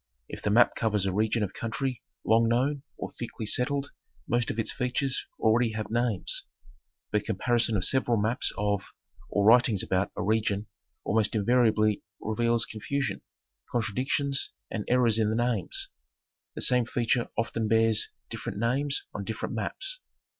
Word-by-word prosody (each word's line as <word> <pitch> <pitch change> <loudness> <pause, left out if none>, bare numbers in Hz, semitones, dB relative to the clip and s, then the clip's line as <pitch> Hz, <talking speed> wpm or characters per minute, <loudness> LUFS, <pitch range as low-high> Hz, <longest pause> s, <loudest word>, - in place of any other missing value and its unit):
If - - -8
the - - 0
map 115 +4 +5
covers 105 -4 +1
a 95 - 0
region 110 +2 +1
of 100 - -3
country 125 +2 -3 0.2
long 115 +1 +4
known 135 +4 +1 0.2
or - - -5
thickly 115 -2 -6
settled 140 +5 0 0.4
most 120 0 +1
of - - -3
its 115 - +1
features 130 +1 -1
already 115 0 +3
have 110 -1 -4
names. 120 -4 0 0.6
But 105 -1 0
comparison 115 +1 +1
of 90 - 0
several 125 -3 +2
maps 110 +4 +1
of, 105 -2 0 0.5
or 100 -1 +1
writings 115 -2 +5
about, 95 +1 0
a - - -1
region 105 -1 +1 0.4
almost 110 0 +1
invariably 110 -1 +3 0.2
reveals 115 +2 +1
confusion, 130 +6 -3 0.5
contradictions 130 +5 0 0.2
and 105 -2 -3
errors 120 -3 +3
in 110 -1 +2
the 110 - 0
names. 125 - -1 0.7
The - - -4
same 125 -3 +4
feature 120 0 0
often 115 -1 -1
bears 110 0 +3 0.2
different - - -5
names 135 +6 0
on 100 - -4
different 110 +4 -4
maps. 390 - -3
115 Hz, 150 wpm, -28 LUFS, 110-125 Hz, 0.7 s, map